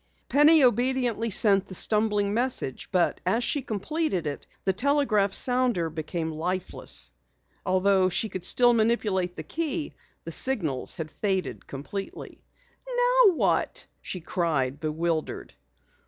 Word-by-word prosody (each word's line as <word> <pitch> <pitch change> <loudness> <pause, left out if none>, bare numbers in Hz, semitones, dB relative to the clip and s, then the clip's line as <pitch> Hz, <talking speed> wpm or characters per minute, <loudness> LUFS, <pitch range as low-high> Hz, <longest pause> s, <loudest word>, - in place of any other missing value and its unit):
Penny 295 +2 +5
obediently 245 -1 +1
sent 195 -2 +5
the 185 - -7
stumbling 210 0 0
message, 240 - 0
but 180 -2 +1
as 210 +7 0
she 285 - -1
completed 235 - -3
it 145 -1 -5 0.2
the 190 - +1
telegraph 240 -4 +1
sounder 245 -8 +2
became 160 +1 -4
lifeless. 180 +4 -2 0.6
Although 185 0 +2
she 205 +5 -1
still 245 +6 +4
could 235 - +1
manipulate 210 -5 0
the - - -7
key, 320 -1 -3 0.3
the - - -7
signals 165 - 0
had 155 -1 -6
faded 190 +4 -3
completely. 175 +9 -8 0.5
"Now - - +4
what?" - - -1 0.2
she 180 - -6
cried, 150 -6 -1
bewildered. 160 +1 -3
200 Hz, 125 wpm, -26 LUFS, 170-250 Hz, 0.6 s, Penny